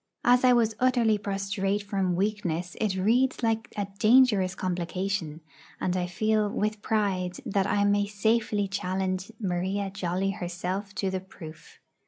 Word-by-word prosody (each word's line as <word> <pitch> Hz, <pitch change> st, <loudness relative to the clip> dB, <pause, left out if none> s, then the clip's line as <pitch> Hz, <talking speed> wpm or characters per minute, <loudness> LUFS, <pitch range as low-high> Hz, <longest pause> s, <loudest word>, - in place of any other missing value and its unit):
As 245 Hz, +1 st, +5 dB
I 255 Hz, -, +6 dB
was 230 Hz, -2 st, +3 dB
utterly 240 Hz, -4 st, +3 dB
prostrate 195 Hz, 0 st, -2 dB
from 195 Hz, -3 st, -1 dB
weakness, 180 Hz, -3 st, -2 dB
it 210 Hz, -4 st, +1 dB
reads 240 Hz, +7 st, +2 dB
like 225 Hz, 0 st, 0 dB
a 205 Hz, -, 0 dB
dangerous 215 Hz, -6 st, +4 dB
complication; 180 Hz, -2 st, -3 dB, 0.4 s
and 180 Hz, -, -1 dB
I 180 Hz, -1 st, -1 dB
feel 215 Hz, +3 st, +1 dB
with 210 Hz, +1 st, -2 dB
pride 190 Hz, -5 st, -1 dB
that 195 Hz, 0 st, 0 dB
I 200 Hz, 0 st, +2 dB
may 205 Hz, 0 st, +2 dB
safely 210 Hz, 0 st, +1 dB
challenge 190 Hz, 0 st, -2 dB
Maria 195 Hz, 0 st, -2 dB
Jolly 190 Hz, 0 st, -1 dB
herself 185 Hz, +2 st, -4 dB
to 195 Hz, -1 st, -1 dB
the 190 Hz, -, -1 dB
proof. 160 Hz, -4 st, -12 dB
195 Hz, 145 wpm, -27 LUFS, 185-215 Hz, 0.4 s, I